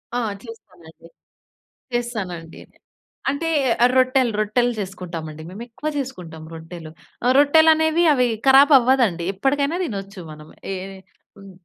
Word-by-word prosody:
ఆ - - +1 0.2
చేస్తానండి. 180 -8 -15 0.9
చేస్తానండి. 190 -9 -5 0.7
అంటే 315 +4 -2 0.5
రొట్టెలు, 255 -2 +3
రొట్టెలు 240 +3 +1
చేసుకుంటాం 180 -4 -6
అండి 155 +1 -11
మేము. 205 +5 -8
ఎక్కువ 270 +6 -5
చేసుకుంటాం 180 - -7
రొట్టెలు. 165 0 -10 0.3
ఆహ్, 250 +1 +3
రొట్టెలనేవి 315 +3 +4
అవి 250 -3 +2 0.2
కరాబ్ 275 +3 +7
అవ్వదండి. 240 -9 +1
ఎప్పటికైనా 280 - 0
తినొచ్చు. 195 - -7
మనం 150 0 -12 0.2
ఎ - - -2 0.6
హ్మ్ 195 0 -13
230 Hz, 115 wpm, -21 LUFS, 180-270 Hz, 0.9 s, కరాబ్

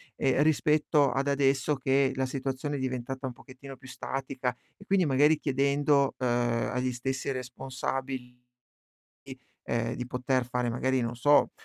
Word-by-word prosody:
ehm, 135 +1 +2
rispetto 150 -1 +3
ad 135 +3 -1
adesso 140 +1 +2
che 135 0 +2
la 130 0 0
situazione 135 +2 -3
è - - -4
diventata 130 +1 -3
un 125 - -6
pochettino 135 +2 -12
più 130 0 -14
statica, 130 -2 -3 0.2
e 200 - -15
quindi 195 -3 +3
magari 145 +2 +4
chiedendo, 140 0 +2
ehm, 120 -2 0
agli 125 0 -1
stessi 130 +3 -3
responsabili, 130 0 -5 1.2
ehm, 115 0 -1
di 125 0 -5
poter 125 0 0
fare 125 -1 -1
magari, 130 +2 0
non 120 0 -3
so, 145 +4 +4
130 Hz, 145 wpm, -28 LUFS, 125-140 Hz, 1.2 s, magari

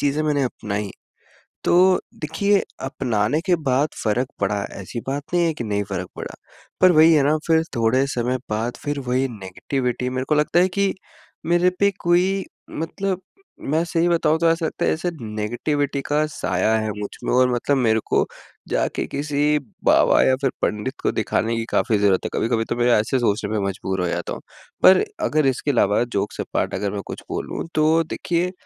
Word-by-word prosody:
चीज़ें 145 +2 +1
मैंने 145 -2 +1
अपनाई। 105 -4 -3 0.7
तो 185 +1 +5 0.2
देखिए 200 +6 +1 0.2
अपनाने 130 -1 0
के 180 - +4
बाद 135 +4 +2 0.2
फ़र्क 120 +4 +1
पड़ा 100 0 0 0.2
ऐसी 100 +5 -6
बात 140 +2 -2
नहीं 175 -1 +3
है 165 - 0
कि 130 - -5
नहीं 105 -2 -1
फ़र्क 95 -1 -4
पड़ा। - - -6 0.5
पर 185 -1 +7
वही 160 0 +6
है 150 - +4
ना 150 +2 +3
फ़िर 160 -1 +4
थोड़े 120 +4 +2
समय 125 -1 -1
बाद 110 +3 -2
फ़िर 145 -1 -2
वही 130 +2 +2
नेगेटिविटी 125 +4 -3
मेरे 130 0 -2
को 155 - +3
लगता 150 +3 +3
है 185 - +4
कि 200 -1 +2 0.5
मेरे 175 +2 +3
पे 200 0 +5
कोई 185 +3 +2 0.3
मतलब 185 +4 -3 0.5
मैं 160 +2 +2
सही 170 0 +1
बताऊँ 160 -2 +2
तो 170 - +4
ऐसा 165 0 0
लगता - - -3
है - - +3
ऐसे 170 +3 -2
नेगेटिविटी 120 +7 -2
का 150 +1 +1
साया 110 -7 0
है 110 0 -2
मुझ 105 -1 -3 0.2
में - - 0
और 125 0 +4
मतलब 140 +4 +1
मेरे 110 -4 +2
को - - +2 0.4
जाके - - -1
किसी 150 +1 0 0.3
बाबा - - +5
या 130 - +4
फ़िर 135 - +2
पंडित 105 +6 -1
को - - +1
दिखाने 115 +1 0
की 115 - -2
काफ़ी 110 - +2
ज़रूरत 100 -2 +3
है, - - -2
कभी-कभी 115 -1 0
तो 120 - -3
मैं 120 0 +1
ऐसे 110 +5 0
सोचने 105 -3 0
पे 110 -1 0
मजबूर 95 -1 -3
हो - - 0
जाता 85 0 -3
हूँ। - - -7 0.4
पर 190 - +7 0.2
अगर 155 -1 +2
इसके 135 +2 0
अलावा 105 -5 +3
जोक्स 105 -4 -3
अपार्ट - - -2
अगर 100 -1 -2
मैं 100 - -3
कुछ - - -7
बोलूँ - - -4
तो 155 +2 +3
देखिए 175 +2 -2
135 Hz, 190 wpm, -22 LUFS, 110-160 Hz, 0.7 s, पर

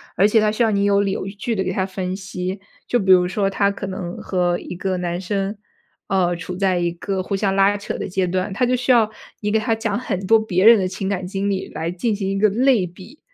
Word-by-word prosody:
而 195 +4 +5
且 220 +1 +4
他 215 0 +2
需 220 +3 +1
要 225 - +2
你 200 -1 +1
有 200 0 +3
理 200 -1 0
有 190 - -3
据 205 +4 -3
地 190 - 0
给 185 - -2
他 190 0 0
分 185 -1 -4
析。 190 -1 -5 0.3
就 245 - +2
比 195 -3 -2
如 180 -1 +6
说 195 +2 0
她 200 +1 +1
可 195 -1 -6
能 185 -2 -5
和 175 -2 0
一 - - -7
个 185 +1 -2
男 175 -1 -2
生， 195 +2 -2 0.5
呃， 180 -2 +1
处 175 +1 -6
在 190 -2 +1
一 175 -1 0
个 185 +2 -3
互 195 - -2
相 195 -1 0
拉 195 +1 +4
扯 200 - -5
的 - - -4
阶 185 0 0
段， 185 +2 -1
她 200 +6 +1
就 250 +1 +2
需 250 +1 +1
要 230 -3 +4 0.3
你 210 - -2
给 215 - +2
她 225 +1 0
讲 225 -2 -1
很 235 -6 -3
多 225 - +6
别 195 -3 0
人 230 0 +9
的 190 - 0
情 190 +1 -4
感 190 -2 -2
经 195 +2 -2
历 195 -1 -2
来 160 +1 -4
进 190 +6 -1
行 195 -2 -3
一 195 - -1
个 210 +2 +4
类 240 -1 +3
比。 185 - -13
195 Hz, 285 characters per minute, -21 LUFS, 185-210 Hz, 0.5 s, 人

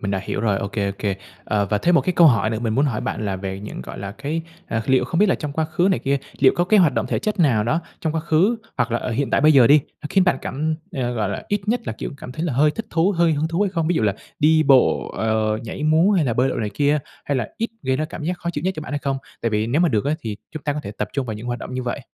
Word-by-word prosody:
mình 100 - -2
đã 95 - 0
hiểu 95 - -3
rồi. 105 -3 +1
Ô 100 - -3
kê, 100 -1 -1
ô 100 - -2
kê. 100 -2 -1 0.3
Ờ, 105 -2 0
và 105 - +2
thêm 175 +11 +2
một - - +6
cái 185 - -1
câu 170 -1 +6
hỏi 110 -6 +3
nữa 110 - -2
mình 115 -1 -1
muốn 140 - +3
hỏi 125 -7 -1
bạn 110 - -3
là 95 -1 -1
về 95 0 -5
những, 105 - -7
gọi - - -9
là, 100 0 -5
cái, 150 +7 -3 0.2
à, 110 0 -2
liệu 130 -1 +3
không 165 +6 -2
biết 210 - +5
là - - +3
trong 150 -2 -5
quá 160 +2 0
khứ 160 +4 +1
này 185 - +2
kia, 140 +1 0 0.2
liệu 135 -1 +6
có 175 - +2
cái 205 +2 +4
hoạt 165 -5 +4
động - - 0
thể - - -1
chất 210 -2 -2
nào 120 -10 +3
đó 155 +9 +1 0.2
trong 160 -1 -1
quá 160 - 0
khứ 170 +8 +2 0.2
hoặc 120 - 0
là - - +2
ở 125 - -4
hiện 135 +4 -1
tại - - +3
bây 155 +2 +6
giờ 130 -5 +7
đi, 145 +1 +6 0.2
nó 150 - -3
khiến 190 -2 +4
bạn 180 - +3
cảm 155 +4 -2 0.2
ờ, 125 -2 -2
gọi 110 -4 -1
là, 100 - -4
ít 205 +1 -2
nhất 245 +2 +2
là, 110 - -2
kiểu, - - -6
cảm 125 - -9
thấy 155 +6 -3
là 165 - -1
hơi 145 +5 +4
thích 225 +8 -6
thú, 170 +5 +2
hơi 170 -2 +3
hứng 155 +2 0
thú 165 +4 -2
hay 200 - 0
không? 165 -4 -1
Ví 175 - +2
dụ 160 - +1
là 105 -2 +2 0.2
đi 155 +1 +4
bộ, 135 -3 +4
ờ, 110 -1 +1
nhảy 115 - -6
múa 160 +6 +4
hay 175 -6 +3
là 120 - 0
bơi 125 +3 +2
lội - - -2
này 105 - -2
kia, 145 +1 +2 0.3
hay 140 - 0
là 120 -4 -2
ít 230 - -2
gây 130 0 0
ra 155 - -1
cảm 155 0 -7
giác 175 +1 -2
khó 170 - -3
chịu 150 -1 -5
nhất 190 - +1
cho 155 - -4
bạn 145 - -7
hay 145 - 0
không? 135 -1 -2 0.2
Tại 115 - +1
vì 105 +1 0
nếu 140 +8 +1
mà 175 - +4
được 110 -5 0
á 145 - +1
thì 110 -7 -5 0.2
chúng 155 -2 -7
ta 145 - 0
có 150 - -3
thể - - -6
tập 105 - -1
trung 135 -2 -2
vào 110 - -3
những 105 +3 -8
hoạt 120 0 -2
động 125 - -7
như 130 - -2
vậy. 125 +3 -3
140 Hz, 340 wpm, -22 LUFS, 110-160 Hz, 0.3 s, giờ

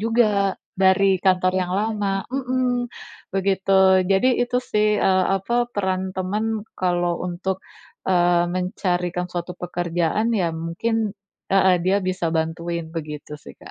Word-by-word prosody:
juga 215 -4 +2 0.2
dari 190 0 +3
kantor 185 -1 +3
yang 180 -1 -1
lama 205 -2 -1
heeh. 255 -2 0 0.5
Begitu, 190 -1 +3
Jadi 195 +6 +3
itu 245 0 0
sih, 210 -3 +1
eee, 185 -1 +3
apa 240 +5 0
peran 190 -3 -1
teman 210 +3 -2
kalau 175 -1 0
untuk, 185 +2 -3 0.5
eee, 175 -1 +3
mencarikan 180 -1 -1
suatu 175 0 -4
pekerjaan, 175 +4 -1
ya 180 -6 +1
mungkin 200 +6 -2 0.4
heeh 190 -1 +5
dia 190 +2 +3
bisa 185 -2 -1
bantuin 165 +1 -2
begitu 150 -2 -6
sih, - - -12
Kak. - - -13
190 Hz, 125 wpm, -22 LUFS, 175-210 Hz, 0.5 s, heeh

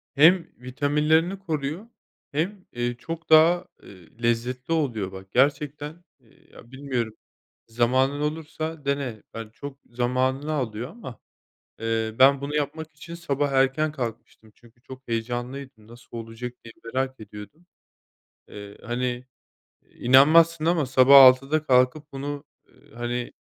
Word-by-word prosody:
Hem 165 +5 +5
vitaminlerini 150 +8 +1
koruyor 160 +2 -4 0.4
hem 180 +6 -3
eee, 120 0 -2
çok 165 +6 -7
daha, 165 +3 +6 0.2
eee, 95 +5 -16
lezzetli 125 +5 -1
oluyor. 120 - -1
Bak 95 0 -11
gerçekten, 150 +4 0 0.2
eee, 120 -4 -27
ya, 120 - -16
bilmiyorum, 130 -5 -3 0.5
zamanın 130 +5 +1
olursa 155 0 -4
dene. 140 -6 -2
Hani, 115 -1 -8
çok 140 +2 -9
zamanını 130 +4 -1
alıyor 125 -3 -3
ama, 175 - -11 0.6
eee, 115 0 -2
ben 135 +1 +6
bunu 145 +1 -4
yapmak 150 +2 -3
için 170 +3 -10
sabah 145 -4 -1
erken 135 +3 +2
kalkmıştım. 115 -5 -7
Çünkü 120 0 -23
çok 130 +1 -13
heyecanlıydım. 120 +1 -5
Nasıl 120 0 -12
olacak 115 +2 -7
diye 115 - -11
merak 130 +3 -3
ediyordum. 105 - -12 0.8
Eee, 100 0 -11
hani, 125 +1 -3 0.7
inanmazsın 155 +6 +5
ama 165 -3 +2
sabah 130 +2 +7
6'da 135 +4 +5
kalkıp 130 +4 +2
bunu, 140 +1 -5 0.2
eee, 145 0 -23
hani, 120 +1 -4
135 Hz, 125 wpm, -25 LUFS, 120-150 Hz, 0.8 s, sabah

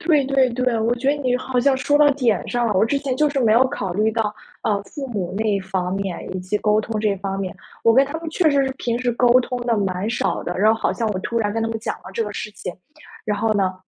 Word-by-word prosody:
对 310 -4 +3
对 270 -1 +3
对， 250 -1 0
我 230 +2 +1
觉 265 +3 0
得 - - +4
你 250 -1 +1
好 255 0 -1
像 270 +1 +3
说 290 +3 +2
到 295 -1 +6
点 240 -8 0
上 240 -1 0
了， 215 - +1
我 190 +4 +3
之 275 +5 0
前 270 -3 -2
就 300 -1 +3
是 285 - -3
没 225 -3 +3
有 250 +4 +5
考 195 -6 -4
虑 215 +5 +2
到， 215 -2 0 0.3
呃， 200 -2 0
父 280 +3 -7
母 190 -4 -3
那 215 -2 +1
方 190 -1 -2
面 195 -2 -3 0.2
以 - - -2
及 185 +3 -2
沟 210 0 +3
通 220 0 -3
这 210 -2 +2
方 195 0 -4
面， 190 -2 -3 0.3
我 230 - +5
跟 270 +2 +5
他 300 +4 -5
们 330 - -5
确 315 0 +2
实 280 -1 +3
是 265 - -3
平 235 -1 -1
时 245 -1 0
沟 245 +1 +2
通 250 0 -4
得 235 -2 +2
蛮 195 0 -1
少 240 - -1
的， 175 - -4
然 215 +3 +5
后 225 - -5
好 - - 0
像 230 - -2
我 190 -3 -2
突 235 +4 -3
然 205 -2 0
跟 225 - -1
他 225 - 0
们 225 - -3
讲 225 - -3
了 - - -25
这 230 - 0
个 210 - -5
事 210 - -5
情， 180 - -7 0.5
然 210 -1 -1
后 220 +1 +1
呢， 190 -2 +1
225 Hz, 305 characters per minute, -21 LUFS, 205-255 Hz, 0.5 s, 到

